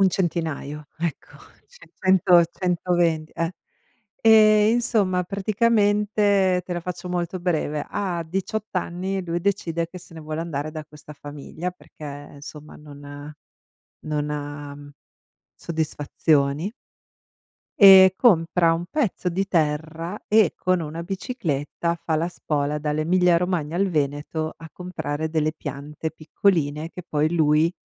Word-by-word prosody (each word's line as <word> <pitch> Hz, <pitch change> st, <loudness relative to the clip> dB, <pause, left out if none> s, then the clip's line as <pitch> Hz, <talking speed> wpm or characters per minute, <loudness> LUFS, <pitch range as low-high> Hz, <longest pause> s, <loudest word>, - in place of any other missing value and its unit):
Un 195 Hz, -, +6 dB
centinaio, 160 Hz, -5 st, -3 dB
ecco, 165 Hz, -2 st, -4 dB, 0.3 s
ce 485 Hz, -, -18 dB
cento, 180 Hz, -2 st, +5 dB
120 175 Hz, -3 st, 0 dB
e 165 Hz, +1 st, -2 dB, 0.7 s
ehm, 215 Hz, -1 st, +6 dB
insomma 205 Hz, -6 st, +1 dB
praticamente, 205 Hz, -1 st, +2 dB
te 180 Hz, -, -5 dB
la 175 Hz, -, -3 dB
faccio 180 Hz, +1 st, -6 dB
molto 180 Hz, 0 st, -2 dB
breve, 155 Hz, -4 st, -1 dB
a 185 Hz, -4 st, -2 dB
18 195 Hz, +5 st, -3 dB
anni 185 Hz, +2 st, -2 dB
lui 170 Hz, 0 st, -2 dB
decide 170 Hz, -4 st, -1 dB
che 180 Hz, -, -12 dB
se 170 Hz, -, -15 dB
ne 160 Hz, -, -8 dB
vuole 155 Hz, +1 st, -5 dB
andare 155 Hz, -2 st, -3 dB
da 155 Hz, -1 st, -6 dB
questa 150 Hz, 0 st, -13 dB
famiglia 145 Hz, +5 st, -6 dB
perché 170 Hz, -3 st, -15 dB, 0.3 s
insomma 150 Hz, +1 st, -11 dB
non 145 Hz, 0 st, -10 dB, 0.7 s
non 150 Hz, -1 st, -2 dB
ha 145 Hz, -1 st, -6 dB, 0.8 s
soddisfazioni. 155 Hz, +1 st, 0 dB, 1.1 s
Ehm, 190 Hz, -2 st, +10 dB
compra 170 Hz, -6 st, +4 dB
un 170 Hz, +1 st, -3 dB
pezzo 225 Hz, -, -1 dB
di 190 Hz, +3 st, -1 dB
terra 160 Hz, +2 st, -1 dB
e 215 Hz, -5 st, +4 dB
con 185 Hz, -1 st, +1 dB
una 160 Hz, +2 st, -5 dB
bicicletta, 170 Hz, -, -2 dB
fa 160 Hz, -, 0 dB
la 165 Hz, +2 st, 0 dB
spola 150 Hz, -3 st, -2 dB
dall'Emilia 170 Hz, +4 st, +2 dB
Romagna 170 Hz, -3 st, -1 dB
al 195 Hz, +2 st, +2 dB
Veneto, 150 Hz, +1 st, -2 dB
a 165 Hz, -, -10 dB
comprare 160 Hz, -4 st, -4 dB
delle 155 Hz, -1 st, 0 dB
piante 150 Hz, +1 st, -6 dB
piccoline, 160 Hz, -2 st, 0 dB
che 180 Hz, -, -9 dB
poi 155 Hz, +1 st, +1 dB
lui 155 Hz, 0 st, +3 dB
170 Hz, 125 wpm, -23 LUFS, 150-185 Hz, 1.1 s, Ehm